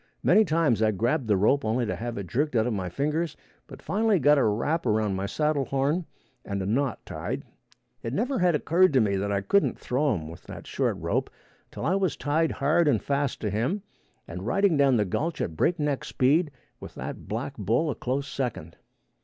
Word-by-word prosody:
Many 220 Hz, -, +6 dB
times 155 Hz, -, +2 dB
I 110 Hz, -, +4 dB
grabbed 120 Hz, -, 0 dB
the 105 Hz, -3 st, +3 dB
rope 135 Hz, +9 st, +3 dB
only 115 Hz, +3 st, 0 dB
to 110 Hz, -, -2 dB
have 120 Hz, 0 st, -5 dB
it 100 Hz, -, -4 dB
jerked 135 Hz, -, -1 dB
out 110 Hz, -1 st, +3 dB
of 125 Hz, -, -1 dB
my 95 Hz, -3 st, -3 dB
fingers, 150 Hz, -, -2 dB, 0.3 s
but -, -, -12 dB
finally 215 Hz, 0 st, +2 dB
got 145 Hz, -2 st, +4 dB
a -, -, +3 dB
wrap 120 Hz, +9 st, 0 dB
around 105 Hz, -2 st, +1 dB
my 95 Hz, +1 st, -2 dB
saddle 150 Hz, +2 st, 0 dB
horn 145 Hz, +7 st, 0 dB, 0.4 s
and 100 Hz, -1 st, -3 dB
a 95 Hz, -, -2 dB
knot 130 Hz, +7 st, -1 dB
tied. -, -, -4 dB, 0.6 s
It 115 Hz, -, -4 dB
never 245 Hz, -, -1 dB
had 180 Hz, -2 st, +3 dB
occurred 170 Hz, +3 st, +3 dB
to 130 Hz, -, +5 dB
me 100 Hz, -4 st, +1 dB
I 100 Hz, -1 st, 0 dB
couldn't 200 Hz, -, +2 dB
throw 135 Hz, 0 st, 0 dB
him 80 Hz, -4 st, -5 dB
with 85 Hz, +2 st, -10 dB
that -, -, -9 dB
short -, -, -1 dB
rope -, -, -1 dB, 0.4 s
till -, -, -6 dB
I 170 Hz, -, +2 dB
was 190 Hz, -7 st, 0 dB
tied 155 Hz, +2 st, +1 dB
hard 155 Hz, +4 st, +2 dB
and 125 Hz, -7 st, +3 dB
fast 140 Hz, +1 st, -1 dB
to 105 Hz, -, -1 dB
him 125 Hz, -, -1 dB, 0.4 s
and 90 Hz, +5 st, -6 dB
riding 195 Hz, +2 st, +3 dB
down 140 Hz, -3 st, +4 dB
the 105 Hz, -, +2 dB
gulch 160 Hz, -, -2 dB
at 80 Hz, -, -3 dB
break 170 Hz, -, +1 dB
neck 145 Hz, -3 st, -1 dB
speed 150 Hz, +6 st, +2 dB, 0.3 s
with -, -, -10 dB
that -, -, -7 dB
black -, -, -4 dB
bull 135 Hz, +8 st, +1 dB
a -, -, -2 dB
close 135 Hz, +3 st, -3 dB
second. 125 Hz, -, -4 dB
135 Hz, 210 wpm, -26 LUFS, 110-155 Hz, 0.6 s, Many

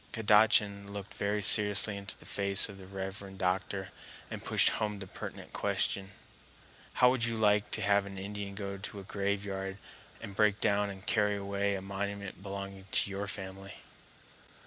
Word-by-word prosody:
Kadachan 105 Hz, -2 st, +4 dB
looked 100 Hz, -1 st, -7 dB
very 105 Hz, +1 st, -1 dB
seriously 105 Hz, 0 st, +6 dB
into 100 Hz, 0 st, -7 dB
the -, -, -15 dB
face 100 Hz, -1 st, +3 dB
of 100 Hz, -1 st, -10 dB
the 95 Hz, -, -11 dB
reverend 95 Hz, 0 st, -6 dB
doctor 95 Hz, +1 st, -1 dB, 0.4 s
and -, -, -6 dB
pushed -, -, +3 dB
home 105 Hz, -2 st, -2 dB
the 100 Hz, -, -7 dB
pertinent -, -, -9 dB
question: 95 Hz, -1 st, 0 dB, 0.8 s
"How 125 Hz, 0 st, +5 dB
would 130 Hz, -3 st, -1 dB
you 115 Hz, -1 st, -1 dB
like 105 Hz, -1 st, +3 dB
to -, -, -2 dB
have 100 Hz, -1 st, +3 dB
an 95 Hz, -1 st, -8 dB
Indian 100 Hz, 0 st, -5 dB
go 100 Hz, -1 st, -5 dB
to 100 Hz, +1 st, -6 dB
a -, -, -8 dB
graveyard 100 Hz, -1 st, -3 dB, 0.4 s
and 100 Hz, -, -8 dB
break 105 Hz, 0 st, +3 dB
down 100 Hz, 0 st, +2 dB
and 95 Hz, 0 st, -9 dB
carry 105 Hz, -1 st, +2 dB
away 100 Hz, 0 st, -1 dB
a 95 Hz, -, -5 dB
monument 100 Hz, 0 st, -5 dB
belonging 100 Hz, -1 st, -7 dB
to 100 Hz, -, +1 dB
your 100 Hz, +1 st, -3 dB
family?" 95 Hz, 0 st, -6 dB
100 Hz, 170 wpm, -31 LUFS, 95-105 Hz, 0.8 s, seriously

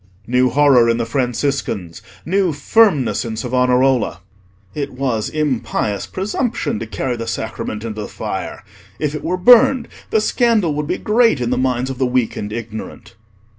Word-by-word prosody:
New 125 Hz, +2 st, +2 dB
horror 135 Hz, -4 st, +4 dB
in 115 Hz, -, +2 dB
the 115 Hz, -, -1 dB
Franciscans; 125 Hz, -, -2 dB, 0.2 s
new 185 Hz, 0 st, +1 dB
firmness 150 Hz, -, +2 dB
in 110 Hz, -1 st, -5 dB
Savonarola. 125 Hz, -3 st, +1 dB, 0.5 s
"It 140 Hz, -2 st, -4 dB
was 125 Hz, -5 st, -1 dB
impious 130 Hz, -8 st, -2 dB
presumption 210 Hz, -, -2 dB
to 115 Hz, -, -5 dB
carry 125 Hz, +3 st, -3 dB
the 115 Hz, 0 st, -5 dB
Sacrament 110 Hz, -1 st, -4 dB
into 110 Hz, -2 st, -5 dB
the 105 Hz, -, -5 dB
fire: -, -, -5 dB, 0.3 s
if 150 Hz, -1 st, -2 dB
it 150 Hz, -, -5 dB
were 180 Hz, +2 st, -1 dB
burned 240 Hz, +5 st, +5 dB, 0.2 s
the 220 Hz, -, +2 dB
scandal 215 Hz, -6 st, +2 dB
would 150 Hz, 0 st, -3 dB
be -, -, -1 dB
great 225 Hz, -, +2 dB
in 120 Hz, 0 st, -1 dB
the -, -, +2 dB
minds 130 Hz, 0 st, 0 dB
of 130 Hz, -, -8 dB
the 130 Hz, -, +2 dB
weak 125 Hz, -2 st, 0 dB
and 105 Hz, -, -5 dB
ignorant." 110 Hz, -1 st, -7 dB
130 Hz, 165 wpm, -18 LUFS, 115-155 Hz, 0.5 s, burned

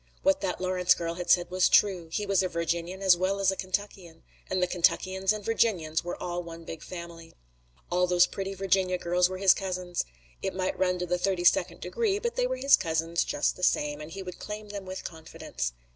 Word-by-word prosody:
What 290 Hz, 0 st, +3 dB
that 190 Hz, -3 st, -2 dB
Lawrence 185 Hz, -1 st, +2 dB
girl 165 Hz, -1 st, -3 dB
had 175 Hz, +1 st, -6 dB
said 175 Hz, -1 st, +4 dB
was 185 Hz, 0 st, +3 dB
true. 185 Hz, -5 st, +3 dB
He 210 Hz, +4 st, -2 dB
was 195 Hz, -2 st, +2 dB
a 185 Hz, -, 0 dB
Virginian 170 Hz, +2 st, -3 dB
as 190 Hz, -2 st, +7 dB
well 190 Hz, +3 st, -1 dB
as 195 Hz, -1 st, +3 dB
a -, -, -3 dB
Kentuckian, 185 Hz, -3 st, -5 dB, 0.3 s
and 185 Hz, -, 0 dB
the 180 Hz, -, +3 dB
Kentuckians 185 Hz, +2 st, +1 dB
and 215 Hz, -2 st, -4 dB
Virginians 180 Hz, -9 st, +1 dB
were 175 Hz, -, -4 dB
all 175 Hz, 0 st, -3 dB
one 165 Hz, -1 st, -9 dB
big 165 Hz, -1 st, -8 dB
family. 170 Hz, -2 st, -9 dB, 0.6 s
All 180 Hz, +1 st, +2 dB
those 180 Hz, 0 st, +5 dB
pretty 195 Hz, +1 st, -5 dB
Virginia 190 Hz, -1 st, +1 dB
girls 180 Hz, +1 st, +2 dB
were 185 Hz, -, -5 dB
his 190 Hz, 0 st, +6 dB
cousins. 180 Hz, -2 st, -3 dB, 0.4 s
It -, -, -3 dB
might 185 Hz, 0 st, -1 dB
run 180 Hz, -1 st, +2 dB
to 180 Hz, -, -2 dB
the 180 Hz, 0 st, -1 dB
thirty 185 Hz, -1 st, 0 dB
second -, -, +3 dB
degree, 445 Hz, -4 st, 0 dB
but 470 Hz, +3 st, -3 dB
they -, -, +1 dB
were -, -, -2 dB
his 275 Hz, -, +6 dB
cousins 165 Hz, 0 st, 0 dB
just -, -, 0 dB
the -, -, -12 dB
same, 150 Hz, -4 st, +1 dB
and 150 Hz, -, -8 dB
he 195 Hz, +3 st, -7 dB
would 180 Hz, -1 st, -8 dB
claim 210 Hz, 0 st, -7 dB
them 200 Hz, -2 st, -7 dB
with 185 Hz, 0 st, -6 dB
confidence. 110 Hz, -, -5 dB
180 Hz, 220 wpm, -28 LUFS, 170-195 Hz, 0.6 s, as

